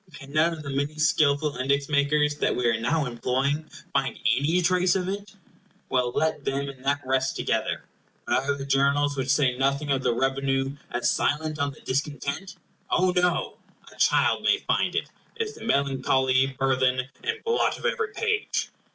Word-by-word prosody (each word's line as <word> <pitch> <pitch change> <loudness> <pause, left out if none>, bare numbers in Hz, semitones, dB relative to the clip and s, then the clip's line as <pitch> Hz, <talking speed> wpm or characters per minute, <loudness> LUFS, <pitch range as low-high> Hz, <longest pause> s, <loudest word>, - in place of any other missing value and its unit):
Can 140 -1 -11
none 155 +2 +3
of 155 -2 -8
the 140 - -5
many 140 +2 -1
skilful 150 -2 +2
index 140 +2 0
makers 150 0 +2
that - - +1
we 125 - -1
are 115 -1 +2
now 145 +5 +1
employing 135 +5 -1 0.2
find 135 -3 0 0.2
any 150 +7 +1
trace 180 +1 +3
of 185 -1 -1
it? 200 +1 -5 0.5
Well, 125 -1 +1
let 155 -2 0
them 140 +1 -2
and 130 -2 -11
that 140 +1 +1
rest 130 0 0
together. - - -1 0.4
But 130 - +1
are 140 - +2
the 135 - -5
Journals, 140 +1 +2
which 135 -1 -2
say 130 -2 +3
nothing 140 +2 0
of 135 -1 +1
the 120 - +1
revenue, 135 +1 0
as 120 0 +1
silent 155 +1 -1
on 140 0 +1
the - - -17
discontent? 145 +5 -3 0.3
Oh 185 +1 +3
no! 180 -1 +1 0.3
a - - -17
child - - +3
may - - +3
find - - +1
it. - - -2 0.2
It 455 - -1
is - - -10
the - - -12
melancholy 135 - +2
burthen 130 -1 +2 0.2
and 455 -1 -3
blot 460 0 +1
of - - -9
every 455 -3 0
page. 455 0 -1
140 Hz, 180 wpm, -26 LUFS, 135-155 Hz, 0.5 s, none